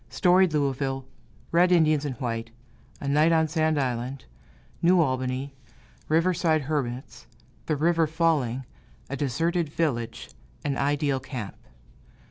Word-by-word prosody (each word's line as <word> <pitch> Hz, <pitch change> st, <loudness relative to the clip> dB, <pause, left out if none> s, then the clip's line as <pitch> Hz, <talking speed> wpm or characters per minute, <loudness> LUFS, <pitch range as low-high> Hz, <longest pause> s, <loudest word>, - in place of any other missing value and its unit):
Storied 180 Hz, +6 st, +4 dB
Louisville 135 Hz, -2 st, -1 dB, 0.5 s
Red 175 Hz, +2 st, +4 dB
Indians 155 Hz, -4 st, +4 dB
and 135 Hz, -3 st, -3 dB
white 115 Hz, -1 st, -3 dB, 0.5 s
A 140 Hz, -, -5 dB
night 150 Hz, +4 st, +4 dB
on 160 Hz, -1 st, +3 dB
Sand 155 Hz, 0 st, +1 dB
Island 125 Hz, 0 st, -3 dB, 0.6 s
New 180 Hz, +2 st, +5 dB
Albany 130 Hz, -2 st, -1 dB, 0.6 s
Riverside 165 Hz, -1 st, +2 dB
hermits 130 Hz, -, -4 dB, 0.4 s
The 155 Hz, -, +1 dB
river 165 Hz, +2 st, +2 dB
falling 150 Hz, -6 st, 0 dB, 0.5 s
A -, -, -1 dB
deserted 165 Hz, +5 st, 0 dB
village 140 Hz, -8 st, -2 dB, 0.3 s
An 140 Hz, -2 st, 0 dB
ideal 145 Hz, -1 st, 0 dB
camp. 125 Hz, -6 st, -6 dB
145 Hz, 115 wpm, -26 LUFS, 130-165 Hz, 0.6 s, New